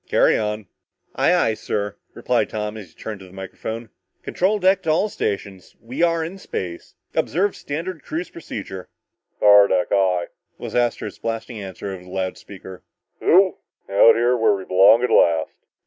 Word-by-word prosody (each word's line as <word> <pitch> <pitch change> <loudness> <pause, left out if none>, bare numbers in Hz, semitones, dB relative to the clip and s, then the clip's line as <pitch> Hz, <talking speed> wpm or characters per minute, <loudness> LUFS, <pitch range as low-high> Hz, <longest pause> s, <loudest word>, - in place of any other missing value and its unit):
Carry - - +4
on." 105 -1 -2 0.5
"Aye, - - +2
aye, 110 - +2
sir," 105 -1 -3 0.2
replied - - 0
Tom 105 0 -4
and 105 -4 -9
he - - -23
turned 105 +4 -7
to 95 - -12
the - - -17
microphone. 110 +4 -7 0.3
"Control 195 +4 +1
deck 190 0 +3
to 165 - -3
all 180 +7 +2
stations! 100 - -4
We 125 +7 -6
are 165 -1 +2
in 190 +4 -8
space! 85 - -6 0.2
Observe 190 +6 0
standard 160 +3 -5
cruise 165 +3 -5
procedure!" 95 - -8 0.5
"Power 100 -1 +7
deck, 90 -2 +1
aye!" 90 -3 +1 0.3
was - - -7
Astro's 120 -1 -1
blasting 115 0 -4
answer 95 0 -6
over 90 -1 -9
the 90 - -15
loud 95 0 -3
speaker. 95 -2 -11 0.4
"Yeeeoooww! 185 +2 +4 0.3
Out 100 +3 +7 0.3
where 110 - +4
we 95 -1 -7
belong 100 +6 +5
at 125 - 0
last." 80 -2 +3
105 Hz, 165 wpm, -22 LUFS, 95-155 Hz, 0.5 s, Power